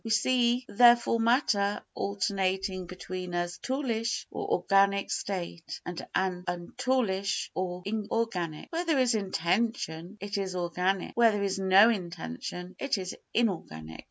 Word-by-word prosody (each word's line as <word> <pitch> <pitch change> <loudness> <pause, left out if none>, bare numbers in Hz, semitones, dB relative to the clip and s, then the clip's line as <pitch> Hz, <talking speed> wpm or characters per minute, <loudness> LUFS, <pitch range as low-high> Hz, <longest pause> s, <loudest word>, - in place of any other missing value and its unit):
We 225 - -5
see, 245 +2 +2
therefore, 235 +1 +5
matter 225 -4 +2
alternating 195 -2 -1
between 185 0 -6
a 175 0 +1 0.2
toolish 245 -4 -1
or - - -4
organic 200 0 +3
state 175 -4 -4
and 175 -1 -5
an 185 -1 0
untoolish 195 +2 -1
or 180 -1 -3
inorganic. 205 - -2
Where 335 +1 -1
there 320 -4 +2
is 255 -2 +3
intention 190 -2 -1
it 200 0 -3
is 190 -2 -3
organic, 180 +2 -1
where 235 -1 +6
there 205 -1 -1
is 195 -1 -1
no 195 +4 +6
intention 180 - -5
it 275 -5 0
is 185 -1 -4 0.2
inorganic. 80 - -2
195 Hz, 130 wpm, -29 LUFS, 180-230 Hz, 0.2 s, where